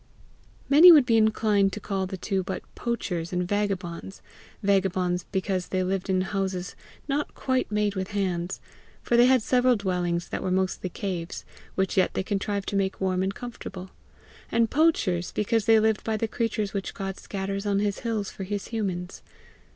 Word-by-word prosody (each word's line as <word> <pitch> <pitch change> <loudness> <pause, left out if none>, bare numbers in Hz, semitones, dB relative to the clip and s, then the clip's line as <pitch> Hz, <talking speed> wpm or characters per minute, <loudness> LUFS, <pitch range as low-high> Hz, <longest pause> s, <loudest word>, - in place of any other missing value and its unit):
Many 320 +6 +9
would 295 -6 +7
be 230 -2 +3
inclined 215 -2 +3
to - - -4
call 195 -2 -2
the 190 0 -5
two 190 +1 -1
but 185 - -5
poachers 180 -8 -3
and 180 -1 -1
vagabonds 195 -2 -3 0.4
vagabonds 185 -3 +1
because 190 -1 -1
they 185 -1 0
lived 190 +1 -2
in 185 -1 +2
houses 190 -2 -3 0.3
not 290 +1 -2
quite 260 -4 -1
made 210 -1 +1
with 190 -1 -3
hands, 185 -3 -2 0.4
for 240 - +1
they 240 +1 +7
had 255 -3 +4
several 250 +1 +3
dwellings 180 -4 -1
that - - -3
were 185 - -2
mostly 185 0 0
caves 180 -2 -5 0.3
which 190 0 0
yet 185 - +2
they - - 0
contrived 200 0 -2
to - - -3
make 195 -1 0
warm 185 -1 0
and 190 +1 -1
comfortable; 195 -6 -8 0.6
and 230 -1 +2
poachers 220 - +2
because 215 0 +1
they 225 -1 +6
lived 220 0 +1
by 220 -1 -1
the 225 - -1
creatures 215 -2 -2
which 195 -2 -4
God 195 -1 -5
scatters 195 +1 -4
on 200 -1 +2
his 205 0 0
hills 220 -4 -2
for 195 - -7
his 200 +1 -4
humans. 190 -5 -3
195 Hz, 175 wpm, -26 LUFS, 185-220 Hz, 0.6 s, Many